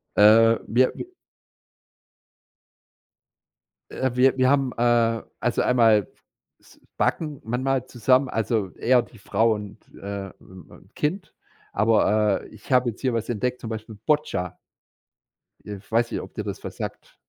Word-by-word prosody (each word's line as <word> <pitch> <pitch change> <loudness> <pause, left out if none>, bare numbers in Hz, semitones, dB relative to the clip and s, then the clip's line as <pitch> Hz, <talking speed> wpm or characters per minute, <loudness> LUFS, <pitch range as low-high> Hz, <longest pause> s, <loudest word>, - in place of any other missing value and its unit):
Äh, 115 +2 +6
wir 125 +3 +2
w - - -6 2.9
Äh, 130 - -1
wir 130 +1 +4
wir 130 -1 +3
haben, 135 -2 +2
äh, 115 -1 +2 0.2
also, 120 - 0
einmal 115 -5 +3 0.5
s - - -22 0.2
backen 150 -4 -1
manchmal 130 +2 -1
zusammen 130 +3 +2
also, 110 -4 -1
eher 125 0 +3
die 115 - -16
Frau 110 +3 +1
und, 105 0 -8 0.2
äh, 100 0 -6
äh, - - -12
ähm, 90 -4 -16
Kind, 170 +7 -3 0.4
aber, 105 -1 +2
äh, - - -13
ich 110 +4 -16
habe 125 -1 +4
jetzt 110 - -14
hier 130 -3 0
was 115 -1 -2
entdeckt, 125 +2 -2
zum 115 - -7
Beispiel 110 -1 -7
Boccia. 90 - 0 1.1
Äh, 105 -1 -7
weiß 115 +1 +1
nicht, - - -3
ob - - -11
dir - - -4
das - - -6
was - - -8
sagt. - - -7
115 Hz, 145 wpm, -24 LUFS, 105-130 Hz, 2.9 s, Äh